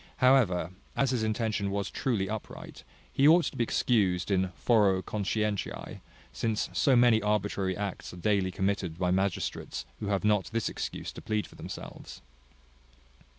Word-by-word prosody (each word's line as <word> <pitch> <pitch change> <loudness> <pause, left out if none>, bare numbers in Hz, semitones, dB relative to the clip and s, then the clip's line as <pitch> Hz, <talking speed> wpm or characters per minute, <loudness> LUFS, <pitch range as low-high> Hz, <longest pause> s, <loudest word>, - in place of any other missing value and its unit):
However, 115 -10 +3 0.2
as 135 -2 +2
his 125 -3 0
intention 110 -2 -1
was 100 0 -2
truly 110 -7 -1
upright, 110 +1 -7 0.3
he 140 - +4
ought 165 +2 +6
to - - -4
be 120 - +1
excused 100 -6 +1
in 95 -1 +1
foro 100 -5 +3
conscientiae; 105 +1 -2 0.3
since 110 -2 -1
so 135 - +3
many 120 -2 +5
arbitrary 105 -3 0
acts 100 -2 -4
are 90 - -10
daily 100 0 +1
committed 95 -3 -1
by 90 -1 +1
magistrates 95 0 -2
who 105 - -4
have 100 0 0
not 105 -3 +3
this 115 0 -2
excuse - - -5
to - - -10
plead 110 -1 -1
for - - -15
themselves. - - -9
105 Hz, 150 wpm, -29 LUFS, 95-115 Hz, 0.3 s, ought